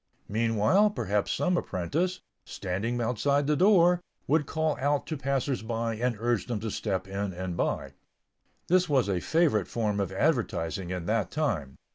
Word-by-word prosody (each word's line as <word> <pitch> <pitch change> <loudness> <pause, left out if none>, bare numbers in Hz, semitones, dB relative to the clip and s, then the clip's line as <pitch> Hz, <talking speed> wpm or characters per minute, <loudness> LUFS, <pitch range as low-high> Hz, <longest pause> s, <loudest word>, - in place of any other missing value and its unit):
Meanwhile, 115 - +3
perhaps 105 - -1
some 180 -1 +1
apprentice, 170 - -1 0.2
standing 100 +6 -3
outside 140 +5 +1
the 150 +1 +2
door, 180 -1 +5 0.2
would 150 -1 +2
call 160 -2 0
out 145 +1 +1
to 160 - -3
passers 135 -2 -1
by 115 0 -2
and 120 +1 -1
urge 120 -4 0
them 120 -4 -2
to 110 -1 -3
step 95 -3 -2
in 100 0 -3
and 90 -1 -4
buy. - - -1 0.8
This 180 0 +3
was 130 -7 +3
a 95 -3 0
favorite 145 - +2
form 105 -3 -1
of 95 -2 -1
advertising 95 - 0
in 90 -2 -4
that 110 +2 0
time. 90 - -2
115 Hz, 160 wpm, -28 LUFS, 100-150 Hz, 0.8 s, door